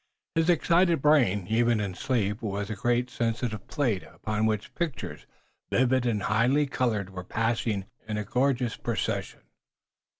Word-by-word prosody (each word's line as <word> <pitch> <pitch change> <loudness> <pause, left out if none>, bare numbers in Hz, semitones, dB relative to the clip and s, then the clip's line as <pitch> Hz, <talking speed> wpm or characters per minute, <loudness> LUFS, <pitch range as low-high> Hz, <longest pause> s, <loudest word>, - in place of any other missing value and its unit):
His 165 +1 +2
excited 170 0 +4
brain, 125 -10 +3
even 115 +1 +2
in 100 -3 -2
sleep, 105 0 -1
was 100 -1 -3
a - - -2
great 120 +4 0
sensitive 115 -3 -2
plate, 120 -11 0
upon 105 +1 -2
which 105 -2 -2
pictures, 165 -7 -4 0.4
vivid 130 0 +3
and 105 -4 0
highly 125 +7 +3
colored, 115 -8 -1
were 90 -1 -6
passing 110 -1 -1 0.2
in 105 -1 -2
a 105 - -1
gorgeous 125 0 +1
procession. - - -3
115 Hz, 140 wpm, -27 LUFS, 105-130 Hz, 0.4 s, excited